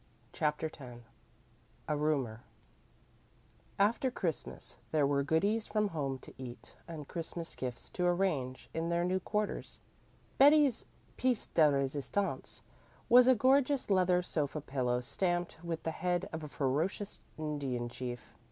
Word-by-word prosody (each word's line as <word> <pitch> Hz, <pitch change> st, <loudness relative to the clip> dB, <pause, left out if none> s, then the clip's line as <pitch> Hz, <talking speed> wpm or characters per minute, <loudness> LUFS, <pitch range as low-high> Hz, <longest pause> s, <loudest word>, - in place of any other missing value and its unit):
CHAPTER 150 Hz, 0 st, 0 dB
X 125 Hz, -4 st, -10 dB, 0.8 s
A 150 Hz, -, +1 dB
RUMOR 140 Hz, -7 st, 0 dB, 1.4 s
After 225 Hz, +6 st, +3 dB
Christmas 175 Hz, -, -4 dB, 0.2 s
there 150 Hz, -2 st, +3 dB
were 140 Hz, 0 st, +2 dB
goodies 200 Hz, +10 st, +1 dB
from 210 Hz, -1 st, +1 dB
home 140 Hz, -6 st, -2 dB
to -, -, -12 dB
eat 125 Hz, -2 st, -9 dB
and 155 Hz, -4 st, -7 dB
Christmas 165 Hz, 0 st, -3 dB
gifts 125 Hz, -2 st, -3 dB
to 180 Hz, -1 st, 0 dB
arrange 165 Hz, -9 st, 0 dB
in 165 Hz, +1 st, -1 dB
their 170 Hz, 0 st, +1 dB
new 185 Hz, +1 st, +1 dB
quarters. 210 Hz, +3 st, -2 dB, 0.6 s
Betty's 285 Hz, -3 st, +6 dB, 0.3 s
piêce 250 Hz, -3 st, +1 dB
de 155 Hz, -2 st, +6 dB
resistance 140 Hz, 0 st, -1 dB, 0.5 s
was 245 Hz, +1 st, +8 dB
a 260 Hz, -, +7 dB
gorgeous 265 Hz, +1 st, +3 dB
leather 180 Hz, -1 st, +4 dB
sofa 155 Hz, -3 st, -1 dB
pillow 125 Hz, -3 st, -1 dB
stamped 175 Hz, +4 st, -1 dB
with 165 Hz, -2 st, -3 dB
the 160 Hz, -, -1 dB
head 180 Hz, +3 st, -1 dB
of 160 Hz, -1 st, -4 dB
a -, -, -5 dB
ferocious 150 Hz, +9 st, -1 dB, 0.2 s
Indian 140 Hz, -6 st, -2 dB
chief. 120 Hz, 0 st, -6 dB
160 Hz, 135 wpm, -33 LUFS, 140-195 Hz, 1.4 s, was